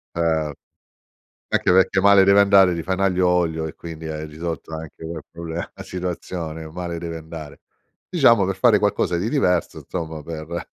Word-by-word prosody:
Eh. 80 -3 0 1.0
Anche - - +2
perché 95 +1 +4
male 100 -1 +6
deve 100 +1 +6
andare, 95 -3 +5
ti 85 - -4
fai 95 0 -1
n'aglio 95 -2 +2
olio 80 -3 +1
e - - -8
quindi 80 -1 -9
hai 80 0 -4
risolto 80 +1 -6
anche 80 0 -9
quel 80 -1 -6
proble 85 0 -6
la - - -11
situazione, 85 -3 -5
male 85 0 -5
deve 85 0 -5
andare. 80 -2 -9 0.5
Diciamo 120 - +5
per 95 0 -2
fare 110 -2 +5
qualcosa 105 -4 +1
di 100 +7 -1
diverso, 90 - +1
insomma 80 -3 -5
per 80 +1 -6
85 Hz, 170 wpm, -22 LUFS, 80-95 Hz, 1.0 s, male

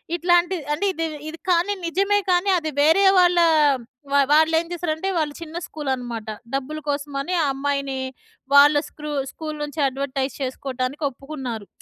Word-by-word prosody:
ఇట్లాంటిది 350 0 +2
అంటే 395 +7 -1
ఇది, 330 -2 -3 0.2
ఇది 320 +1 -7
కానీ 360 +3 +3
నిజమే 395 +4 +2
కానీ 360 +2 +2
అది 315 -2 -3
వేరే 320 +7 +5 0.2
వాళ్ళ 355 0 +4 0.7
వా 280 - +4
వాళ్ళేం 320 +2 +4
చేసారంటే 345 +1 -2
వాళ్ళు 305 -3 0
చిన్న 330 0 -8
స్కూల్ 295 -3 -5
అన్నమాట 240 -4 -5 0.3
డబ్బుల 285 +3 -3
కోసమని 285 +3 -2
ఆ - - +2
అమ్మాయిని 275 -1 -2 0.6
వాళ్ళ 290 +1 +8
స్క్రూ 300 0 -7 0.2
స్కూల్ 310 -1 -6
నుంచి 295 +1 -6
అడ్వర్‌టైజ్ 270 0 -3
చేసుకోవటానికి 260 +2 -3
ఒప్పుకున్నారు. 260 -6 -7
300 Hz, 140 wpm, -22 LUFS, 275-335 Hz, 0.7 s, వాళ్ళ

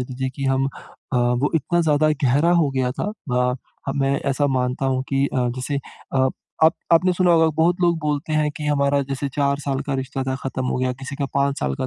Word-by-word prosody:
लीजिए 130 +1 -3
कि 140 - -3
हम 135 0 +2
अ, 135 -1 -8
वो 125 +3 +2
इतना 175 +3 +1
ज़्यादा 155 -1 +3 0.2
गहरा 145 +7 +3
हो 145 - +1
गया 130 -2 0
था। 205 +10 -3 0.2
अ, 125 0 +2 0.3
ह - - 0
मैं 140 0 +1
ऐसा 145 +2 +1
मानता 130 0 0
हूँ 130 -1 0
कि 135 0 +1
अ, - - -5 0.2
जैसे 135 +3 -2 0.4
अ, 130 0 +3 0.4
आप 160 - +6 0.2
आपने 180 +2 +5
सुना 180 0 +2
होगा 165 -1 +5
बहुत 170 +2 +3
लोग 170 -1 +3
बोलते 150 0 -2
हैं 155 -1 +2
कि 150 - -4
हमारा 140 -1 +2
जैसे 140 +1 -3
4 140 -1 +1
साल 135 -2 -2
का 140 - -1
रिश्ता 135 0 -3
था 130 0 -1
खत्म 130 -1 -3
हो - - -1
गया, 130 0 0
किसी 135 +2 -8
का 140 - -1
5 140 0 +1
साल 65 0 -1
का - - -2
140 Hz, 230 wpm, -22 LUFS, 130-150 Hz, 0.4 s, आप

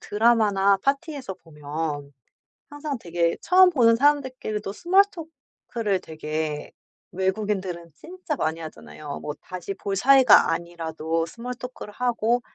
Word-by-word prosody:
드라마나 205 -3 +3
파티에서 275 - -2
보면 150 -2 -6 0.6
항상 290 -1 -5
되게 170 -2 0
처음 370 +1 +6
보는 230 -6 +5
사람들끼리도 260 -7 0
스몰토크를 320 - -1
되게 155 -1 -4 0.4
외국인들은 190 -3 -2
진짜 350 - -6
많이 160 -7 -2
하잖아요. 155 -2 -8
뭐 150 +1 -5
다시 185 +1 -6
볼 200 0 -3
사이가 260 +3 +6
아니라도 165 -1 -3
스몰토크를 245 +1 -8
하고 240 0 0
205 Hz, 295 characters per minute, -24 LUFS, 165-260 Hz, 0.6 s, 처음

